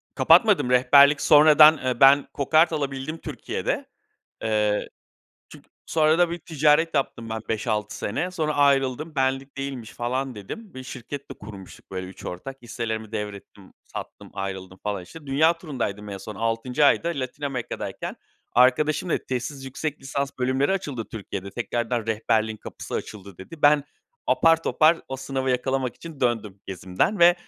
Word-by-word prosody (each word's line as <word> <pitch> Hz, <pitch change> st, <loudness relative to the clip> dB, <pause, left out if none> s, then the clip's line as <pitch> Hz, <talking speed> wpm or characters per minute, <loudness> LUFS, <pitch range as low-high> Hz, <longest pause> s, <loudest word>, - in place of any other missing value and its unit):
Kapatmadım. 125 Hz, -, +5 dB
Rehberlik, 140 Hz, +4 st, +6 dB
sonradan, 155 Hz, +1 st, +7 dB
eee, 130 Hz, -3 st, -2 dB
ben 140 Hz, +1 st, +6 dB
kokart 155 Hz, +4 st, +3 dB
alabildim 140 Hz, +1 st, -3 dB
Türkiye'de. -, -, -4 dB, 0.6 s
Eee, 105 Hz, -1 st, 0 dB, 0.6 s
çün -, -, -14 dB, 0.2 s
sonra 155 Hz, 0 st, +3 dB
da 175 Hz, -1 st, +3 dB
bir 170 Hz, -, -4 dB
ticaret 155 Hz, 0 st, +2 dB
yaptım 125 Hz, -5 st, -2 dB
ben 110 Hz, 0 st, -3 dB
5-6 110 Hz, -1 st, -2 dB
sene. 165 Hz, -, -2 dB
Sonra 155 Hz, -4 st, -2 dB
ayrıldım. 140 Hz, +2 st, +2 dB
"Benlik 135 Hz, 0 st, -1 dB
değilmiş" 135 Hz, -5 st, -5 dB
falan 130 Hz, +2 st, -3 dB
dedim, 175 Hz, -, -9 dB
bir 130 Hz, -, -7 dB
şirket 130 Hz, +2 st, -8 dB
de -, -, -6 dB
kurmuştuk 100 Hz, -3 st, -12 dB
böyle 95 Hz, -1 st, -5 dB
3 95 Hz, -, -12 dB
ortak. 130 Hz, +10 st, -6 dB
Hisselerimi 110 Hz, -2 st, -4 dB
devrettim, 100 Hz, -2 st, -7 dB
sattım, -, -, -9 dB
ayrıldım 95 Hz, -1 st, -6 dB
falan 100 Hz, -3 st, -3 dB
işte. 145 Hz, -, -13 dB
Dünya 160 Hz, +5 st, +3 dB
turundaydım 120 Hz, -, -4 dB
en 100 Hz, -1 st, -6 dB
son, 105 Hz, +2 st, -8 dB
6'ncı 115 Hz, +6 st, 0 dB
ayda 155 Hz, +4 st, +4 dB
Latin 140 Hz, -3 st, -5 dB
Amerika'dayken 130 Hz, -4 st, -4 dB, 0.4 s
arkadaşım 145 Hz, +7 st, +3 dB
dedi, -, -, -1 dB
"Tezsiz 130 Hz, +2 st, -4 dB
yüksek 145 Hz, +3 st, -4 dB
lisans 140 Hz, +1 st, -3 dB
bölümleri 130 Hz, +5 st, +1 dB
açıldı 145 Hz, -11 st, -3 dB
Türkiye'de, 100 Hz, -2 st, -6 dB
tekrardan 120 Hz, +1 st, -2 dB
rehberliğin 110 Hz, 0 st, 0 dB
kapısı -, -, -9 dB
açıldı" 100 Hz, -3 st, -7 dB
dedi. 150 Hz, -, -11 dB
Ben, 145 Hz, -1 st, +5 dB, 0.4 s
apar 165 Hz, 0 st, +4 dB
topar 160 Hz, +1 st, +4 dB
o 135 Hz, -, -4 dB
sınavı 135 Hz, 0 st, -2 dB
yakalamak 130 Hz, 0 st, -1 dB
için 165 Hz, -4 st, -11 dB
döndüm 110 Hz, -5 st, -1 dB
gezimden 95 Hz, -, -1 dB
ve 175 Hz, +1 st, +7 dB
130 Hz, 150 wpm, -24 LUFS, 110-150 Hz, 0.6 s, sonradan